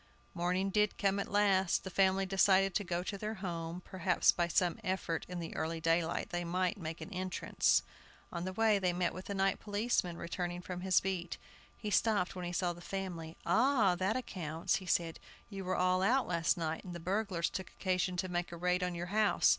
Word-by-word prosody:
Morning 180 Hz, +2 st, 0 dB
did 210 Hz, +1 st, +2 dB
come 200 Hz, 0 st, +1 dB
at -, -, -3 dB
last. 195 Hz, -3 st, +3 dB
The 190 Hz, -, -6 dB
family 195 Hz, +1 st, +3 dB
decided 195 Hz, 0 st, +4 dB
to 205 Hz, -, 0 dB
go 175 Hz, -1 st, -2 dB
to 200 Hz, +1 st, -4 dB
their 215 Hz, +2 st, -3 dB
home; 170 Hz, -3 st, -4 dB
perhaps 185 Hz, -2 st, +3 dB
by 175 Hz, -1 st, 0 dB
some 175 Hz, 0 st, +1 dB
effort 185 Hz, -3 st, -2 dB
in 180 Hz, -, -5 dB
the 165 Hz, -, -6 dB
early 165 Hz, +1 st, -2 dB
daylight 165 Hz, +1 st, 0 dB
they 175 Hz, 0 st, -1 dB
might 180 Hz, +3 st, 0 dB
make 160 Hz, -1 st, -5 dB
an -, -, -7 dB
entrance. 185 Hz, 0 st, +1 dB, 0.5 s
On 170 Hz, -1 st, -4 dB
the 185 Hz, -, -3 dB
way 215 Hz, +1 st, +3 dB
they 180 Hz, -2 st, +1 dB
met 175 Hz, -1 st, 0 dB
with 185 Hz, -, -8 dB
the 200 Hz, -, -4 dB
night 195 Hz, 0 st, +1 dB
policeman, 205 Hz, -4 st, 0 dB
returning 175 Hz, 0 st, -4 dB
from 180 Hz, -1 st, -5 dB
his 190 Hz, -1 st, +3 dB
beat. 185 Hz, -3 st, -3 dB, 0.4 s
He 210 Hz, -, -4 dB
stopped 205 Hz, -4 st, +2 dB
when 180 Hz, -1 st, -4 dB
he 175 Hz, -, -3 dB
saw 175 Hz, 0 st, 0 dB
the 175 Hz, -, -13 dB
family. 175 Hz, -4 st, -5 dB
"Ah! 235 Hz, -6 st, +4 dB
that 190 Hz, +6 st, 0 dB
accounts," 170 Hz, -7 st, -2 dB
he 185 Hz, -, -9 dB
said; 165 Hz, -2 st, 0 dB, 0.3 s
"you 195 Hz, -1 st, -5 dB
were 185 Hz, 0 st, -1 dB
all 185 Hz, 0 st, +3 dB
out 250 Hz, +7 st, +3 dB
last 170 Hz, +1 st, +1 dB
night, 160 Hz, -1 st, -2 dB
and 180 Hz, -2 st, -7 dB
the -, -, -5 dB
burglars 185 Hz, -1 st, 0 dB
took 190 Hz, -, -5 dB
occasion 185 Hz, -1 st, -1 dB
to 185 Hz, -, -1 dB
make 175 Hz, -1 st, -2 dB
a 170 Hz, -, -6 dB
raid 180 Hz, +1 st, +1 dB
on 180 Hz, -1 st, -1 dB
your 170 Hz, -, -3 dB
house. 215 Hz, -1 st, +4 dB
185 Hz, 210 wpm, -33 LUFS, 175-195 Hz, 0.5 s, decided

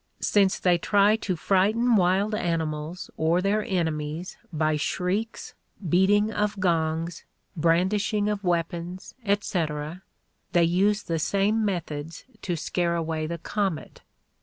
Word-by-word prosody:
Since 195 Hz, -2 st, +3 dB
they 175 Hz, -2 st, +2 dB
try 205 Hz, +3 st, +4 dB
to 190 Hz, -4 st, -2 dB
frighten 210 Hz, +7 st, +2 dB
wild 195 Hz, +2 st, +2 dB
animals 165 Hz, -4 st, -2 dB
or 165 Hz, +2 st, +2 dB
their 200 Hz, +3 st, +1 dB
enemies 160 Hz, -2 st, -2 dB, 0.2 s
by 155 Hz, -1 st, +1 dB
shrieks, 190 Hz, +8 st, -2 dB, 0.3 s
beating 205 Hz, +5 st, +3 dB
of 210 Hz, -1 st, -1 dB
gongs, 165 Hz, -2 st, 0 dB, 0.3 s
brandishing 190 Hz, +6 st, +1 dB
of 210 Hz, -1 st, -2 dB
weapons, 175 Hz, +1 st, -2 dB
etc., 170 Hz, -6 st, -1 dB, 0.5 s
they 175 Hz, -2 st, +5 dB
use 195 Hz, +5 st, +2 dB
the 165 Hz, -2 st, -2 dB
same 200 Hz, +6 st, +1 dB
methods 165 Hz, -5 st, -4 dB, 0.2 s
to 175 Hz, -, -2 dB
scare 170 Hz, +2 st, -1 dB
away 160 Hz, -1 st, -2 dB
the 170 Hz, +1 st, -4 dB
comet. 190 Hz, 0 st, -3 dB
180 Hz, 120 wpm, -26 LUFS, 165-205 Hz, 0.5 s, they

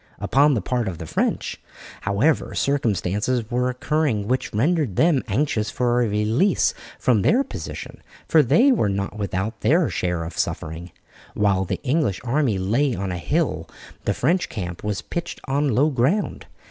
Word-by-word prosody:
Upon 140 Hz, +7 st, +3 dB
the 110 Hz, -, 0 dB
part 120 Hz, -3 st, -1 dB
of 90 Hz, -3 st, -4 dB
the 80 Hz, -, -7 dB
French, -, -, -2 dB, 0.5 s
however, 135 Hz, +11 st, +1 dB
circumstances 115 Hz, -2 st, 0 dB
were 125 Hz, +1 st, +1 dB
occurring 125 Hz, -5 st, 0 dB
which 130 Hz, +2 st, -1 dB
rendered 140 Hz, -, +1 dB
them 160 Hz, -, +3 dB
anxious 110 Hz, -1 st, 0 dB
for 120 Hz, +1 st, +1 dB
a 120 Hz, -, +2 dB
release 110 Hz, -, +2 dB, 0.2 s
from 120 Hz, -7 st, +2 dB
their 245 Hz, -, +3 dB
position, -, -, -8 dB, 0.3 s
for 160 Hz, -, +5 dB
they 235 Hz, -, +4 dB
were 195 Hz, -, +2 dB
not 100 Hz, 0 st, -2 dB
without 100 Hz, +2 st, -3 dB
their 165 Hz, +3 st, +3 dB
share 90 Hz, -2 st, -1 dB
of 80 Hz, -, -7 dB
suffering. 80 Hz, +3 st, -3 dB, 0.5 s
While 100 Hz, -2 st, +2 dB
the -, -, -3 dB
English 135 Hz, -, +1 dB
army 130 Hz, -4 st, +1 dB
lay 115 Hz, +9 st, +1 dB
on 95 Hz, 0 st, -3 dB
a 90 Hz, -, -3 dB
hill -, -, -1 dB, 0.4 s
the -, -, +1 dB
French 170 Hz, +7 st, +1 dB
camp 90 Hz, -5 st, -6 dB
was 105 Hz, -2 st, -2 dB
pitched 170 Hz, 0 st, -5 dB
on 140 Hz, +2 st, +1 dB
low 150 Hz, +4 st, +3 dB
ground. 140 Hz, -, 0 dB
120 Hz, 160 wpm, -23 LUFS, 100-145 Hz, 0.5 s, for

